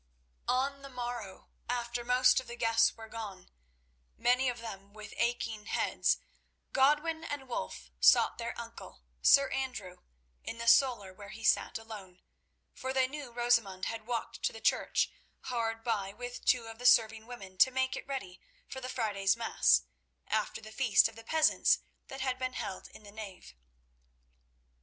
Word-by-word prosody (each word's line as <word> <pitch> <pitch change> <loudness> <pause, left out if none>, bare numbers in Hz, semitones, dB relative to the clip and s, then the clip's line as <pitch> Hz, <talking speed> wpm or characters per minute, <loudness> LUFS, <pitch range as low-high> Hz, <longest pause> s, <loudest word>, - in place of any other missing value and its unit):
On 275 +2 0
the 275 - -9
morrow, 240 -6 -6 0.2
after 240 0 -2
most 250 +2 +4
of 260 - -9
the 240 - -7
guests 225 -1 +3
were 225 0 -9
gone, 210 -5 -8 0.7
many 250 +2 +3
of 245 - -4
them 200 -4 -9
with 210 -1 -10
aching 230 -3 -1
heads, - - +1 0.6
Godwin 300 +4 +3
and 290 -4 -5
Wulf 95 - -5
sought - - +5
their - - -4
uncle, - - -10 0.2
Sir 275 -1 +6
Andrew, 230 -9 -4 0.5
in 230 - -6
the 230 0 -5
solar 230 -5 +4
where 200 +1 -11
he 225 +3 -10
sat - - +2
alone, 205 -5 -11 0.5
for 260 0 -4
they 260 -1 +3
knew 280 -2 -7
Rosamund 235 -6 +1
had 225 -1 -5
walked 240 -2 -3
to - - +1
the 225 - -10
church 220 - +1 0.3
hard 225 -2 -2
by 205 -5 -1
with 245 +2 -7
two 245 -2 +3
of 225 0 -10
the 245 - +2
serving 225 -2 +4
women 195 -7 -9
to 260 - +7
make 260 0 0
it - - -7
ready 260 -10 -5 0.3
for 265 - -7
the 255 - -5
Friday's 205 -5 +1
mass, 65 - +3 0.4
after - - -1
the 215 - -11
feast 235 -2 +4
of - - -16
the 225 - -11
peasants 315 +6 +3 0.3
that 270 0 -7
had 260 -1 -1
been 255 0 -2
held 190 - -5
in - - -15
the 205 - -12
nave. 195 - -9
235 Hz, 165 wpm, -31 LUFS, 210-255 Hz, 0.7 s, to